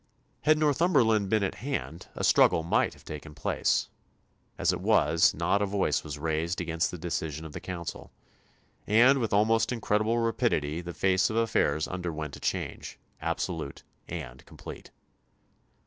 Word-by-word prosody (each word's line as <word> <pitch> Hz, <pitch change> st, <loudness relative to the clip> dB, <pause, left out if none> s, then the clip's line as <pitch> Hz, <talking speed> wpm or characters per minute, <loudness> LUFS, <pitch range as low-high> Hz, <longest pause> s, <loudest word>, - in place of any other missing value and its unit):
Had 155 Hz, 0 st, +4 dB
Northumberland 135 Hz, -, +3 dB
been 110 Hz, -1 st, +2 dB
at 95 Hz, -, -1 dB
hand 130 Hz, -, -4 dB
a -, -, -4 dB
struggle 80 Hz, -, +4 dB
might 85 Hz, -, +1 dB
have -, -, -20 dB
taken 75 Hz, 0 st, -8 dB
place; -, -, 0 dB, 0.7 s
as -, -, +2 dB
it -, -, -4 dB
was, 80 Hz, +2 st, +3 dB
not 100 Hz, -, +1 dB
a 100 Hz, -, +1 dB
voice 95 Hz, -7 st, 0 dB
was 75 Hz, -2 st, -6 dB
raised 80 Hz, +4 st, -1 dB
against 85 Hz, -1 st, -1 dB
the 90 Hz, -, -6 dB
decision 80 Hz, -2 st, -4 dB
of 80 Hz, -, -8 dB
the -, -, -5 dB
Council, 85 Hz, -3 st, -7 dB, 0.8 s
and 125 Hz, +6 st, +5 dB
with 115 Hz, -3 st, -1 dB
almost 110 Hz, +3 st, +3 dB
incredible 110 Hz, -1 st, +1 dB
rapidity 115 Hz, -, 0 dB
the 85 Hz, 0 st, -8 dB
face 95 Hz, 0 st, +2 dB
of 110 Hz, -, -3 dB
affairs 115 Hz, -8 st, +1 dB
underwent 80 Hz, -5 st, -4 dB
a -, -, -11 dB
change, -, -, -4 dB, 0.2 s
absolute 70 Hz, -, -3 dB, 0.2 s
and 70 Hz, -7 st, -7 dB
complete. -, -, -10 dB
90 Hz, 150 wpm, -28 LUFS, 80-115 Hz, 0.8 s, and